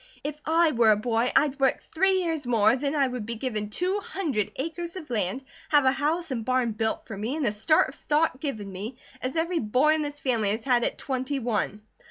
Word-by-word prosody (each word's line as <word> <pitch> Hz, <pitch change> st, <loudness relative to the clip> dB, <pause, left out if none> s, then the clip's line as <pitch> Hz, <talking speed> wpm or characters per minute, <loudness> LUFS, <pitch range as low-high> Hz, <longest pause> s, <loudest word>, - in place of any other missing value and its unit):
If 295 Hz, +1 st, -3 dB
I 325 Hz, 0 st, +4 dB
were 230 Hz, -4 st, +4 dB
a 215 Hz, -, +6 dB
boy, 230 Hz, +3 st, 0 dB
I'd 285 Hz, -2 st, +3 dB
work 270 Hz, -1 st, +3 dB
three 375 Hz, +2 st, +1 dB
years 320 Hz, -6 st, -2 dB
more 220 Hz, -3 st, +4 dB
and 250 Hz, +2 st, -1 dB
then 285 Hz, +1 st, -1 dB
I 280 Hz, -2 st, +3 dB
would 250 Hz, -3 st, -4 dB
be 230 Hz, +2 st, -4 dB
given 215 Hz, -4 st, -3 dB
two 365 Hz, -, -1 dB
hundred 305 Hz, -, -2 dB
acres 335 Hz, +5 st, -4 dB
of 315 Hz, -8 st, -8 dB
land, 210 Hz, +3 st, -1 dB, 0.3 s
have 295 Hz, -3 st, +4 dB
a 260 Hz, -, +6 dB
house 310 Hz, +3 st, -1 dB
and 235 Hz, -3 st, -2 dB
barn 255 Hz, 0 st, +1 dB
built 220 Hz, +1 st, -2 dB
for 220 Hz, -, -7 dB
me, 220 Hz, +8 st, -3 dB
and 310 Hz, -3 st, -1 dB
a 210 Hz, -, +2 dB
start 225 Hz, +10 st, +3 dB
of -, -, -10 dB
stock 300 Hz, -3 st, +1 dB
given 220 Hz, -10 st, -4 dB
me, 210 Hz, +7 st, -6 dB, 0.2 s
as 255 Hz, +4 st, -3 dB
every 335 Hz, +1 st, 0 dB
boy 255 Hz, +8 st, +3 dB
in 315 Hz, -, 0 dB
this 290 Hz, -1 st, -4 dB
family 230 Hz, -7 st, +1 dB
has 220 Hz, +2 st, -1 dB
had 245 Hz, -3 st, +2 dB
at -, -, -1 dB
twenty 260 Hz, +1 st, -2 dB
one." 215 Hz, -4 st, -2 dB
260 Hz, 235 wpm, -26 LUFS, 225-310 Hz, 0.3 s, a